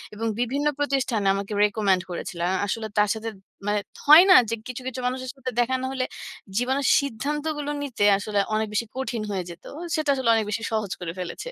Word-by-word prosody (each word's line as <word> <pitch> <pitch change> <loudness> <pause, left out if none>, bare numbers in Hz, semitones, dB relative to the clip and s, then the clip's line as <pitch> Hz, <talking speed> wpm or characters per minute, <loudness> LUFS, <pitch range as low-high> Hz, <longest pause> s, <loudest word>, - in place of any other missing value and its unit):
এবং 225 +2 -2
বিভিন্ন 275 +5 0
প্রতিষ্ঠানে 260 -8 0
আমাকে 200 +1 -4
রিকমেন্ড 205 -3 +2
করেছিল। 170 0 -5
আ - - +1 0.2
আসলে 220 +2 -2
তার 210 -1 +4
সাথে 225 +1 -4 0.4
মানে, 210 0 +2 0.3
হয় 310 +4 +11
না - - +10
যে, 230 - 0
কিছু, 250 0 -6
কিছু 260 0 -4
মানুষের 255 0 -3
সাথে 260 -1 -5
দেখা 245 +2 +2
না - - -2
হলে, 255 -1 -1 0.5
জীবনের 260 +3 +1
সিদ্ধান্তগুলো 295 +3 -3
নিতে 235 -7 0
আসলে 205 0 -1 0.2
অনেক 220 0 0
বেশি 215 +2 0
কঠিন 240 -4 -2
হয়ে 185 -2 -2
যেত? 170 - -14 0.3
সেটা 310 -2 -1
আসলে 260 -3 0
অনেক 220 -1 +1
বেশি 220 +1 -2
সহজ 215 -3 -1
করে 165 -2 -4
ফেলেছে। 180 -1 -5
230 Hz, 195 wpm, -25 LUFS, 210-265 Hz, 0.5 s, হয়